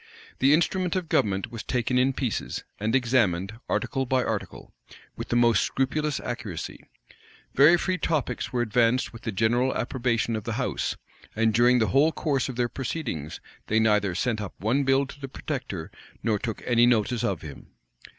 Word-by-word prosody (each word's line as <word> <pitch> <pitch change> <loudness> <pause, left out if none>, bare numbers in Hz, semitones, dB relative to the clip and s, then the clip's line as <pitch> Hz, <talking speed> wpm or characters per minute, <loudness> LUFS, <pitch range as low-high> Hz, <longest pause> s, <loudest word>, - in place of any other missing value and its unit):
The 135 +2 +4
instrument 180 +4 +2
of 180 -4 -2
government 95 -2 +1
was 115 -2 -6
taken 125 0 0
in 130 +1 +3
pieces, 125 -4 -3 0.2
and 110 +3 0
examined, 115 -5 +1
article 130 +5 -1
by 130 0 +2
article, - - -5 0.4
with - - -6
the - - 0
most 120 -1 +4
scrupulous 150 +2 -1
accuracy: 115 -9 -6 0.7
very 150 +6 +7
free 185 +1 -1
topics 125 -9 -1
were 120 -1 +1
advanced 120 +2 +1
with 115 - -10
the 115 - -3
general 120 +6 +1
approbation 120 -2 -1
of 110 - -4
the - - -3
house: - - -2 0.4
and 110 0 +2
during 120 +3 +5
the 110 -3 +2
whole 145 +4 +4
course 140 -5 -1
of 130 - -5
their 120 0 +1
proceedings, 120 - -4 0.3
they 110 - +2
neither 105 -4 +2
sent 115 +2 -1
up 100 - -6
one 125 +8 +1
bill 135 +1 +3
to 140 - -12
the 135 - -5
protector, 125 - -5 0.3
nor 110 -2 +1
took 110 0 -5
any 120 0 +4
notice 120 0 +1
of 95 -5 -1
him. 75 -3 -10
120 Hz, 175 wpm, -26 LUFS, 110-135 Hz, 0.7 s, very